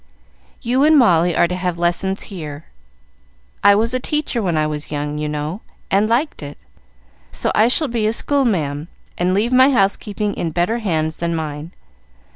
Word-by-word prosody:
"You 250 +4 +2
and 310 +1 +5
Molly 175 - +4
are 175 - +3
to 180 - -3
have 180 -1 -2
lessons 175 +3 -1
here. 150 -4 -7 1.0
I 200 0 +7
was 225 +3 +1
a 255 - +1
teacher 300 -3 -1
when 175 -5 0
I 155 - +2
was 150 -1 -5
young, 150 0 -3
you 150 0 -2
know, 150 +7 -4 0.3
and 205 +3 +2
liked 255 - 0
it, 145 0 -8 0.7
so - - -2
I 215 - +4
shall 295 +5 +2
be 225 -3 0
school 280 +4 0
ma'am, 155 - -1 0.3
and 180 +1 0
leave 225 +5 +1
my 260 +2 +6
house 200 -7 +3
keeping 210 0 -4
in 170 - -3
better 175 +8 0
hands 160 -7 -1
than 170 0 -2
mine. 155 0 -5
185 Hz, 180 wpm, -19 LUFS, 155-230 Hz, 1.0 s, I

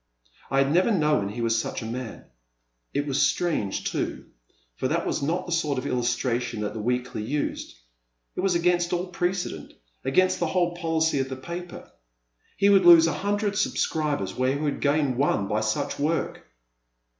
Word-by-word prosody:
I 135 - 0
had 135 +1 +3
never 180 +7 +3
known 150 - +2
he 115 +4 -5
was 115 0 +2
such - - -5
a - - -6
man. 120 0 -6 0.7
It 145 +1 -1
was 145 0 0
strange 145 - 0
too - - -3 0.3
— - - -40
for - - -1
that - - -1
was - - -1
not 170 +6 -1
the 175 - -7
sort 155 -5 0
of 130 - -3
illustration 120 -2 -1
that 105 - -3
the 110 - -5
Weekly 125 0 -2
used; 140 +7 -3 0.6
it - - -5
was 185 -1 +1
against 175 0 +2
all 175 +1 0
precedent 180 0 -3
— - - -43
against 185 +6 +2
the 170 - +1
whole 175 0 0
policy 160 -3 0
of 135 0 -1
the 130 - -4
paper. 170 +6 -8 0.7
He 200 - +3
would 195 -2 +6
lose 170 -2 +9
a 165 - +1
hun 200 +8 -1
dred 205 -1 -1
subscribers 150 - 0
where 130 +1 +1
he 140 - -3
would 150 -2 -2
gain 145 -3 +1
one 125 -7 +1
by 105 +2 0
such 110 +5 -2
work. 160 +3 -1
150 Hz, 190 wpm, -25 LUFS, 125-175 Hz, 0.7 s, lose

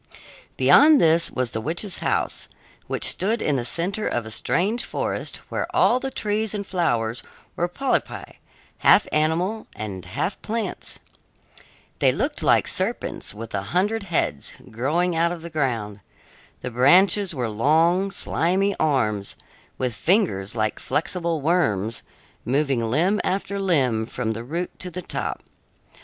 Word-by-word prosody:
Beyond 300 0 +7
this 165 +1 +5
was 125 -2 -2
the 110 - -3
witch's 175 - -2
house, - - -1 0.4
which - - -2
stood 220 +5 0
in 150 - 0
the 120 - -2
center 185 - 0
of 120 -2 -1
a 110 - -7
strange 200 - 0
forest, - - -3
where - - -2
all 250 - +4
the 270 - -3
trees 215 -3 -2
and 200 -1 -4
flowers 120 -11 0 0.3
were 175 - 0
polypi, 270 +9 -2 0.4
half - - +6
animals 170 +8 0
and 100 -4 -6
half 135 - -3
plants. 220 -3 -3 1.0
They - - +4
looked - - -2
like - - +3
serpents - - -1
with 115 +2 -8
a 100 - -1
hundred 190 - 0
heads, 165 - -1 0.2
growing 160 +10 0
out 170 +1 +2
of 170 -2 -6
the 170 - -8
ground. 115 -9 -2 0.6
The 125 - -5
branches 175 - +4
were 125 -3 -1
long, 160 - +2
slimy 195 +1 0
arms, 110 -10 0 0.4
with 125 -2 -1
fingers 110 - +1
like 110 -1 -1
flexible 170 -1 -2
worms, 115 - +1 0.4
moving 135 0 +1
limb 165 - +1
after 200 +1 -2
limb 130 - +1
from 115 -2 -3
the 115 +1 -6
root 170 +8 -5
to 180 - -3
the 180 +1 -7
top. - - -4
160 Hz, 145 wpm, -23 LUFS, 115-190 Hz, 1.0 s, Beyond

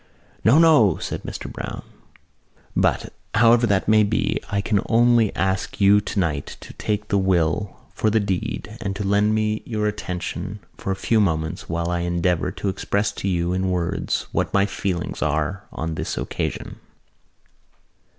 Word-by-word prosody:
"No, 120 +7 +6
no!" 155 - +6
said - - -4
Mr - - -6
Browne. - - -6 0.9
"But, - - +1 0.2
however 115 +2 +5
that 100 -2 +1
may 110 0 +5
be, 105 +1 +1
I 100 - 0
can 100 +1 +1
only 120 -2 +4
ask 95 0 -1
you 100 +1 +6
tonight 85 -9 -2
to - - -11
take 105 0 -3
the 100 - +2
will 95 +1 +1 0.2
for 110 - +1
the 110 +1 +3
deed 110 +3 -3
and 100 -3 -3
to 105 - -3
lend 105 +2 +2
me 110 0 0
your 110 -3 -2
attention 95 -1 -4 0.2
for - - -6
a 95 - +1
few 110 +3 +1
moments 80 -5 -1
while 85 +1 -1
I 85 - 0
endeavour 85 0 0
to 100 - -5
express 100 +2 -1
to - - -5
you 90 -1 0
in 95 0 0
words 90 +1 -1
what - - -1
my 100 0 +4
feelings 95 -3 -3
are 75 +6 -1
on 80 +1 -4
this - - -4
occasion. - - -4
100 Hz, 160 wpm, -23 LUFS, 90-110 Hz, 0.9 s, No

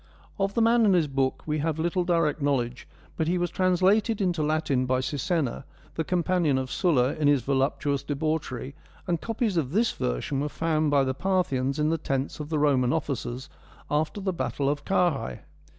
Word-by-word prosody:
Of 195 0 0
the 230 - +3
man 230 +1 +4
and 200 -4 +5
his 170 -3 +3
book 135 -2 -1
we 155 0 -1
have 155 +1 -1
little 175 +3 0
direct 165 -4 +1
knowledge, 125 -4 -1 0.3
but 160 - 0
he 180 +2 +1
was 175 0 -1
translated 190 +4 +2
into 175 -5 0
Latin 150 -4 0
by 130 0 +2
Sisenna, 145 0 -1 0.3
the 160 - -2
companion 175 -4 +1
of 130 0 -3
Sulla 140 -8 +2
in 150 -2 0
his 145 -4 +3
voluptuous 140 +1 0
debauchery, 145 -3 -3 0.3
and 170 -3 -1
copies'of 210 - -1
this 225 +4 +2
version - - -2
were 145 +1 -1
found 155 -1 0
by 140 -1 +4
the 130 0 -1
Parthians 140 -5 0
in 150 0 +1
the 165 0 0
tents 135 -2 -2
of 150 0 -6
the 160 - 0
Roman 135 -4 +3
officers 130 -4 -3 0.4
after 155 +6 0
the 190 -1 -2
battle 130 -2 -2
of 145 0 -2
Carrhae. 155 - 0
150 Hz, 185 wpm, -26 LUFS, 135-175 Hz, 0.4 s, and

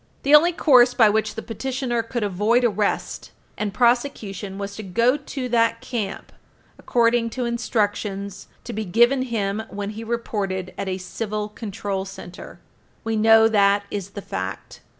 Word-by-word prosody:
The 280 - +2
only 320 +4 +7
course 255 -8 +5
by 220 -3 +6
which 215 0 0
the 225 - -5
petitioner 250 +1 -2
could 230 0 -4
avoid 210 +5 +2
arrest 210 -3 -1 0.3
and 210 -1 -2
prosecution 220 -5 0
was 200 0 -5
to - - -5
go 230 +7 +2
to 275 -3 -5
that 230 -1 +2
camp 215 -6 -5 0.5
according 235 -1 +2
to 250 - -1
instructions 205 -4 -2 0.2
to - - -7
be 215 - -3
given 240 +7 +3
him 220 -4 -2
when 205 0 -5
he 220 +1 -7
reported 205 -5 -3
at 200 - -4
a 185 - -2
Civil 210 +2 -4
Control 200 -2 -4
Center. 185 -2 -10 0.4
We 225 0 -1
know 225 +1 +6
that 200 -2 +3
is 200 -2 -4
the 200 - -5
fact. 95 +1 -6
220 Hz, 155 wpm, -23 LUFS, 200-240 Hz, 0.5 s, only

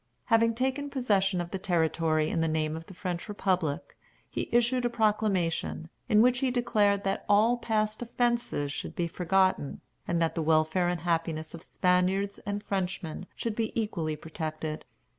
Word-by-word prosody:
Having 230 -1 +3
taken 265 +4 -1
possession 200 -9 +1
of 175 0 -4
the 190 - -3
territory 160 -3 +1
in 165 - 0
the 165 - +2
name 155 0 0
of 165 +1 -8
the - - -10
French 180 +1 -4
republic, 185 -7 -1 0.3
he - - -4
issued 240 +1 +3
a 240 - +2
proclamation, 210 -8 0 0.2
in 215 -1 +6
which 250 0 +3
he 265 - +1
declared 210 -5 +2
that 195 0 -1
all 215 +4 +5
past 215 -1 -1
offences 235 - 0
should - - -5
be 175 - 0
forgotten, 185 -3 +1 0.3
and 170 -1 +1
that 165 -1 +1
the 165 - -2
welfare 160 +3 +2
and 175 -2 -2
happiness 165 -2 -1
of 170 - -8
Spaniards 185 +3 +1
and 205 0 -2
Frenchmen 185 -3 -3
should 230 -2 -3
be 225 -1 -1
equally 165 -8 -2
protected. 155 0 -5
190 Hz, 165 wpm, -29 LUFS, 165-220 Hz, 0.3 s, in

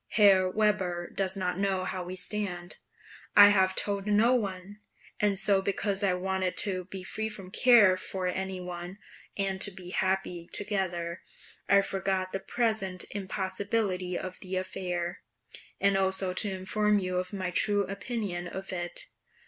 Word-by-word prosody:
Herr 195 -3 +5
Weber 185 -4 0
does 190 0 -1
not 180 -1 -2
know 190 -2 0
how 185 -1 -3
we 180 +1 -6
stand; 185 -3 -3 0.6
I 205 0 +10
have 190 -2 +3
told 200 0 +1
no 215 +4 +4
one; 200 -3 -3 0.4
and 205 -2 +2
so 195 0 +5
because 200 0 -1
I 195 -3 +2
wanted 185 0 -2
to 185 -3 +2
be 190 0 -8
free 220 +3 -2
from 195 -3 -8
care 220 -7 +6
for 185 0 -4
any 190 +1 -2
one, 180 +1 -7 0.4
and 195 -1 -1
to 205 - +4
be 185 -2 -10
happy 185 -3 -1
together, 185 -4 -2 0.5
I 200 +1 +6
forgot 190 -1 -1
the 195 - -1
present 195 -3 -1
impossibility 190 -1 -2
of 185 0 -6
the 190 -1 -5
affair, 180 -2 -3 0.6
and 200 0 +3
also 190 -1 +1
to 205 +2 0
inform 205 +3 +1
you 185 -2 -1
of 180 0 -2
my 185 -3 -3
true 205 +2 +2
opinion 195 -3 -4
of 190 +1 -6
it. 175 -1 0
190 Hz, 155 wpm, -29 LUFS, 185-200 Hz, 0.6 s, I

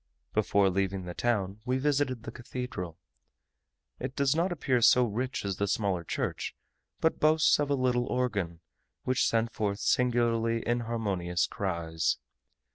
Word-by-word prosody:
Before 100 -1 +3
leaving 95 0 -1
the 90 - -5
town 105 -4 -1
we 130 +1 0
visited 135 -4 0
the - - -6
cathedral. 120 -9 -6 1.0
It 130 - -5
does 140 0 +2
not 175 +3 +1
appear 135 -7 +1
so 125 +2 +6
rich 120 +2 -3
as 100 -2 -2
the 100 - 0
smaller 95 -4 0
church, - - -3 0.5
but 160 - +2
boasts 155 0 +4
of 145 -1 0
a 140 - +3
little 125 -2 +1
organ, 100 -10 -1 0.4
which 130 0 +2
sent 115 0 +1
forth 100 -2 -1
singularly 115 -2 +1
inharmonious 110 -7 0
cries. 85 -4 -1
115 Hz, 140 wpm, -29 LUFS, 95-130 Hz, 1.0 s, so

